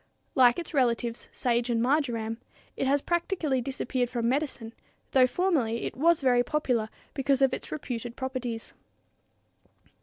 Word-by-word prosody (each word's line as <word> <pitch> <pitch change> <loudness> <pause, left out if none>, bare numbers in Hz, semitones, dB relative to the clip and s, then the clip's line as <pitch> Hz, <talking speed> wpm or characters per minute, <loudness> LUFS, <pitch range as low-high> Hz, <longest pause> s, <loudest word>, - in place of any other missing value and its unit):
Like 245 -2 +5
its 345 - -5
relatives 235 -3 0
sage 240 0 0
and 235 -1 +1
marjoram, 235 -4 0 0.4
it 270 - -1
has 280 +1 +2
practically 340 -6 0
disappeared 255 -1 -2
from 235 -2 -1
medicine, 260 -4 -2 0.4
though 255 -1 +5
formerly 255 -8 0
it - - -4
was 330 +4 +3
very 250 -2 +4
popular 245 -5 0 0.2
because 275 -1 +1
of 270 - +3
its - - -5
reputed 245 -5 -5
properties. 255 -3 -4
255 Hz, 140 wpm, -28 LUFS, 235-280 Hz, 0.4 s, Like